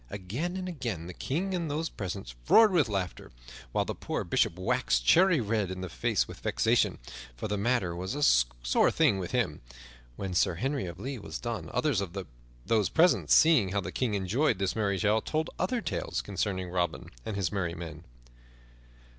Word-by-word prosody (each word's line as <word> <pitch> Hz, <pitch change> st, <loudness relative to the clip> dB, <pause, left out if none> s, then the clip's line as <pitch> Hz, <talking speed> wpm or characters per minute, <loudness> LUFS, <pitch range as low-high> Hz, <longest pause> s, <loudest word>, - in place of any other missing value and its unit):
Again 120 Hz, -, -4 dB
and 185 Hz, -1 st, -4 dB
again 120 Hz, -, -4 dB
the 90 Hz, -, -7 dB
King 180 Hz, -, -2 dB
and 170 Hz, -3 st, -2 dB
those 155 Hz, +3 st, -1 dB
present 95 Hz, -, -6 dB, 0.2 s
roared 225 Hz, -2 st, +7 dB
with 160 Hz, -10 st, +3 dB
laughter, 95 Hz, -3 st, -3 dB, 0.4 s
while -, -, +1 dB
the -, -, -3 dB
poor -, -, -3 dB
Bishop 85 Hz, -, +1 dB
waxed -, -, 0 dB
cherry 180 Hz, -, +5 dB
red 105 Hz, -3 st, 0 dB
in 95 Hz, 0 st, -5 dB
the 95 Hz, -, -5 dB
face -, -, 0 dB
with -, -, -10 dB
vexation, -, -, +1 dB, 0.4 s
for -, -, -3 dB
the 105 Hz, -, -1 dB
matter 100 Hz, -4 st, 0 dB
was 95 Hz, +8 st, -4 dB
a 145 Hz, -, -1 dB, 0.4 s
sore -, -, +4 dB
thing 95 Hz, -, +3 dB
with 90 Hz, -, -4 dB
him. -, -, -1 dB, 0.5 s
When 95 Hz, +4 st, -4 dB
Sir 90 Hz, -1 st, +2 dB
Henry 135 Hz, -, -2 dB
of 85 Hz, 0 st, -7 dB
the 95 Hz, -, -10 dB
Lea 135 Hz, -1 st, -4 dB
was 80 Hz, -4 st, -6 dB
done, 120 Hz, -2 st, -4 dB
others 140 Hz, -10 st, +1 dB
of 95 Hz, -1 st, -5 dB, 0.5 s
those 110 Hz, -3 st, +2 dB
present, 170 Hz, +2 st, +3 dB
seeing 130 Hz, -, +5 dB
how 100 Hz, -, +1 dB
the 90 Hz, 0 st, -5 dB
King 115 Hz, -2 st, -1 dB
enjoyed 105 Hz, +6 st, +1 dB
this 95 Hz, 0 st, -1 dB
merry 100 Hz, -3 st, 0 dB
tale, 110 Hz, +2 st, +2 dB
told 155 Hz, +6 st, -2 dB
other 235 Hz, +6 st, 0 dB
tales -, -, -3 dB
concerning 95 Hz, -2 st, -2 dB
Robin 90 Hz, -1 st, -2 dB
and 110 Hz, -, -4 dB
his 95 Hz, -4 st, -1 dB
merry 90 Hz, -4 st, -2 dB
men. 80 Hz, -2 st, -8 dB
100 Hz, 190 wpm, -29 LUFS, 90-145 Hz, 0.5 s, roared